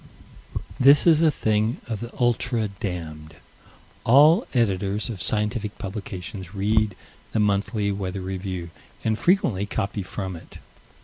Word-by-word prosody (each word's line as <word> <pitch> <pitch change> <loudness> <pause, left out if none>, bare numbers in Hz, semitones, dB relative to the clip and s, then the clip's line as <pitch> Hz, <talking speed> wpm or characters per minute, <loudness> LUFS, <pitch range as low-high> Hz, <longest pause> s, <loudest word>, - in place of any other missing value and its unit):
This 140 +3 +7
is 165 -2 +6
a 165 - +5
thing 110 -4 0
of 110 -3 -3
the 120 0 -6
ultra 120 -2 +1
damned. 80 -5 -6 0.7
All 150 - +6
Editors 105 -2 0
of 105 -6 -5
scientific 105 +1 -1
publications 95 -2 -7
read 105 0 +1 0.4
the 110 - +1
Monthly 105 0 +1
Weather 95 -1 -3
Review 95 -2 -5 0.3
and 110 -1 +1
frequently 115 - +1
copy 100 0 -2
from 95 0 -5
it. 80 - -12
105 Hz, 125 wpm, -24 LUFS, 95-115 Hz, 0.7 s, This